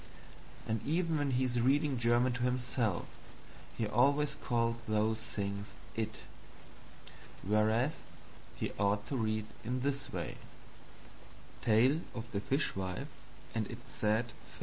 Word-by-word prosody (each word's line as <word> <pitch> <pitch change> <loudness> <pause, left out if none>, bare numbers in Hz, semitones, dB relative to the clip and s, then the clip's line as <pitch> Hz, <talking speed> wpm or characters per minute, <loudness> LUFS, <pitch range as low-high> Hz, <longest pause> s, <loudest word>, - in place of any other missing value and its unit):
And 110 0 -1
even 165 +1 +1
when 145 -1 +1
he 130 0 +2
is 120 -2 +1
reading 140 +1 +3
German 120 +2 +3
to 125 - -4
himself, 125 -5 +1 0.7
he 115 - +1
always 140 +7 +3
calls 115 -1 0
those 110 +1 +2
things 100 -2 -4 0.2
"it," 110 -1 -3 1.2
whereas 110 - +2 0.5
he - - -2
ought 100 0 +2
to 140 - -1
read 110 -3 0 0.2
in 125 +3 -1
this 140 0 -1
way: - - -3 1.2
TALE 125 +8 +4
OF 115 0 -6
THE 100 -3 -1
FISHWIFE 95 -9 -1 0.4
AND 110 -2 0
ITS 120 +2 -9
SAD 110 +2 +2
FATE - - -14
2. - - -12
115 Hz, 130 wpm, -34 LUFS, 110-130 Hz, 1.2 s, TALE